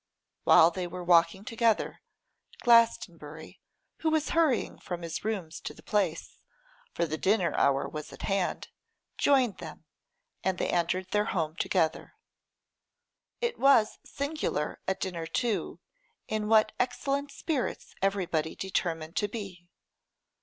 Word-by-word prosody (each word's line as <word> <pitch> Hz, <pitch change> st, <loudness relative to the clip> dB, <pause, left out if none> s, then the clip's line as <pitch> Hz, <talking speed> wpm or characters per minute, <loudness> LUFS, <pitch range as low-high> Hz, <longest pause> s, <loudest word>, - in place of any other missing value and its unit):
While 165 Hz, +2 st, +7 dB
they 180 Hz, 0 st, -4 dB
were 180 Hz, +1 st, -7 dB
walking 175 Hz, +3 st, +3 dB
together, 230 Hz, -2 st, 0 dB, 0.6 s
Glastonbury, 175 Hz, -, +2 dB, 0.4 s
who 320 Hz, -, 0 dB
was 315 Hz, -1 st, +1 dB
hurrying 320 Hz, -7 st, +1 dB
from 175 Hz, -1 st, -6 dB
his 165 Hz, -1 st, -4 dB
rooms 195 Hz, -7 st, -3 dB
to -, -, -6 dB
the -, -, -16 dB
Place, 190 Hz, -6 st, -1 dB, 0.5 s
for -, -, 0 dB
the 155 Hz, -1 st, -4 dB
dinner 190 Hz, -3 st, +2 dB
hour 135 Hz, 0 st, +2 dB
was 150 Hz, -1 st, -7 dB
at -, -, -10 dB
hand, 195 Hz, -2 st, -1 dB, 0.5 s
joined 260 Hz, -7 st, +3 dB
them, 160 Hz, -1 st, -9 dB, 0.6 s
and 190 Hz, -1 st, 0 dB
they -, -, -1 dB
entered 180 Hz, +2 st, 0 dB
their 210 Hz, 0 st, +2 dB
home 160 Hz, -3 st, -2 dB
together. 170 Hz, -3 st, 0 dB, 1.3 s
It 475 Hz, 0 st, -1 dB
was 270 Hz, -6 st, +4 dB
singular 280 Hz, -, -3 dB
at 190 Hz, -, -1 dB
dinner, 170 Hz, -3 st, -3 dB
too, 225 Hz, +6 st, -1 dB, 0.5 s
in 215 Hz, -1 st, -2 dB
what 220 Hz, 0 st, +5 dB
excellent 275 Hz, +3 st, -1 dB
spirits 285 Hz, -5 st, -3 dB
everybody 180 Hz, -5 st, 0 dB
determined 165 Hz, -4 st, -2 dB
to 205 Hz, -, +2 dB
be. 195 Hz, -5 st, -8 dB
190 Hz, 130 wpm, -29 LUFS, 170-230 Hz, 1.3 s, While